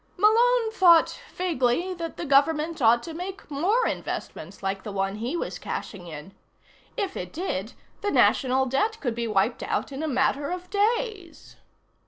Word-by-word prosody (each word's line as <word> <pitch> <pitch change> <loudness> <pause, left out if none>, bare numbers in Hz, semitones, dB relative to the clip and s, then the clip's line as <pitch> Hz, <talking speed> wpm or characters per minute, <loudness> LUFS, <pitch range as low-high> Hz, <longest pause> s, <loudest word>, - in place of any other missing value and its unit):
Malone 455 +3 +4
thought 345 -6 +5
vaguely 345 0 0
that 335 -2 -6
the 345 - -4
government 300 +3 +2
ought 235 0 +5
to 330 - -7
make 365 0 -7
more 390 - +2
investments 185 +5 -5
like 195 0 -2
the 210 - -7
one 195 0 -2
he 245 +10 -3
was - - -4
cashing 180 -4 -6
in. 160 +4 -9 0.6
If 400 -5 -2
it 180 0 -5
did, 250 - -3 0.3
the 410 - 0
National 265 -8 +3
Debt 425 - 0
could 245 -5 -2
be 235 0 -3
wiped 215 +3 +1
out - - -2
in 275 +2 -5
a 315 - -1
matter 275 +1 +1
of 360 0 -6
days. 420 -4 -2
305 Hz, 165 wpm, -26 LUFS, 235-375 Hz, 0.6 s, thought